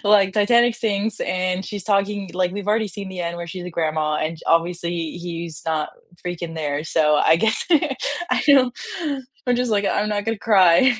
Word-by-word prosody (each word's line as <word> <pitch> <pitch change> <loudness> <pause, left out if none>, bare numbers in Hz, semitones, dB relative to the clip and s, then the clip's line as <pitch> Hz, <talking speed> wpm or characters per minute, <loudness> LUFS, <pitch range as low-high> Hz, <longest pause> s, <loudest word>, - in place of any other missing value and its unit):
like, 200 -2 +4
Titanic 235 +3 +4
sinks 220 -2 -1
and 185 +1 -1
she's 205 -3 -5
talking 200 -2 0
like, 180 0 0
we've 205 +1 -5
already 215 0 +1
seen 195 +1 -7
the 185 - -6
end 170 0 -3
where 170 0 -6
she's 180 +1 -7
a 180 - -6
grandma 155 -2 -1
and 155 +1 -3
j - - -16
obviously 170 0 0
he's 170 -3 -6
not 155 -2 -1 0.3
freaking 170 -2 -5
there, 150 -2 -2
so 155 -2 +2
I 160 +2 +4
guess 220 +6 +1 0.6
I - - +2
don't, 260 -4 +5 0.7
I'm 245 -1 +2
just, 250 -1 0
like, 205 -1 +1
"I'm 210 +1 0
not 205 -1 -1
gonna 225 -2 -2
cry 205 +5 +5
185 Hz, 190 wpm, -22 LUFS, 165-210 Hz, 0.7 s, don't